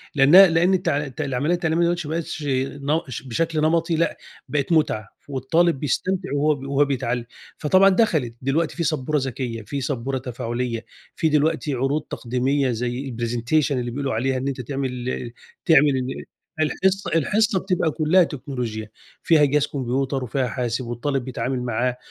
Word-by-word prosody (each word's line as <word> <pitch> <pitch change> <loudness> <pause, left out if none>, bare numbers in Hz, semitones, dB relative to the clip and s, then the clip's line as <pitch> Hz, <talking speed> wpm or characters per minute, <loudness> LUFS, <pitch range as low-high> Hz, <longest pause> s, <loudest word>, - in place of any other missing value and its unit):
لأنها 155 +8 +8
لأن 175 +3 +3
التع 170 -5 +1
الت 135 +3 -6
العمليّة 140 +3 0
التعليمية 165 -1 +1
دلوقتي 175 -2 -1
ما 160 - -2
بقتش 165 -2 -4
ن 140 +3 0
ش 125 - -6
بشكل 155 +5 -1
نمطي 165 +1 +2
لأ، 170 +1 0 0.3
بقت 145 +3 -1
مُتعة، 130 -10 +1 0.2
والطالب 145 +4 +1
بيستمتع 185 +7 -1
وهو 150 +1 +2
ب 135 0 -8
وهو 140 +1 +3
بيتعلِّم، 125 -3 -2 0.3
فطبعًا 185 +6 +5
دخلت، 160 - +1
دلوقتي 150 +5 0
في 170 - 0
سبورة 155 -2 0
ذكيّة، 125 -4 -3
في 140 +6 -4
سبورة 135 0 -2
تفاعلية، 120 -2 -4 0.3
في 160 - +1
دلوقتي 150 0 +1
عروض 135 +4 0
تقديمية 130 +2 -1
زي 125 +3 -3
الpresentation 120 +6 0
اللي 125 -3 -1
بيقولوا 135 +1 -2
عليها، 130 +4 0
إن 130 +2 -3
أنت 135 -2 -3
تعمل 125 -1 -3
ال 120 -2 -4 0.3
تعمل 150 -3 +6
ال 130 +1 -4 0.4
الحصّة 190 +5 0
الحصّة 205 +5 +2
بتبقى 180 -4 0
كلّها 165 +4 +4
تكنولوجيا، 125 -8 -5 0.3
فيها 155 -3 +5
جهاز 145 +1 +2
كمبيوتر 135 0 -2
وفيها 125 +1 -1
حاسب، 120 +1 -2
والطالب 125 +3 -2
بيتعامل 125 0 -2
معاه، 125 +1 -1
140 Hz, 160 wpm, -23 LUFS, 125-160 Hz, 0.4 s, لأنها